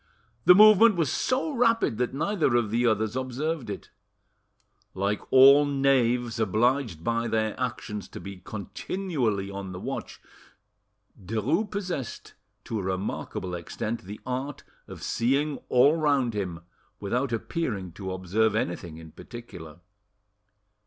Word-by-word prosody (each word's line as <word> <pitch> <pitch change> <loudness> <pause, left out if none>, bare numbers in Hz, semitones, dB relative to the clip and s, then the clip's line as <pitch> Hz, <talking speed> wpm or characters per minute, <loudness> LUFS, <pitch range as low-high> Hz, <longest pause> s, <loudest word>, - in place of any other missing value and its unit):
The 180 - +9
movement 215 +1 +8
was 160 -7 0
so 270 +5 0
rapid 230 - +2
that 125 - 0
neither 155 - 0
of 115 -4 +1
the 120 +2 +2
others 110 0 0
observed 130 +1 -3
it. 100 - -7 1.0
Like 100 +2 -1
all 135 +2 +8
knaves, 125 -4 +1
obliged 110 - +1
by 115 +2 0
their 110 -1 0
actions 105 -5 -4
to - - -9
be 100 0 -8
continually 110 - -3
on 100 -1 -6
the 90 - -6
watch, - - -6 1.0
Derues 115 - 0
possessed 180 - -5 0.3
to 110 - -3
a - - -4
remarkable 95 -1 -3
extent 105 +6 -4
the 105 +3 -8
art 130 +3 -4 0.2
of - - -10
seeing 140 +5 0
all 140 +5 +5
round 140 -7 +1
him 90 -5 -4 0.4
without 125 +7 -1
appearing 110 - -3
to 95 +2 -6
observe 100 +4 0
anything 85 -6 -3
in 80 -1 -11
particular. 90 - -11
120 Hz, 130 wpm, -27 LUFS, 100-140 Hz, 1.0 s, The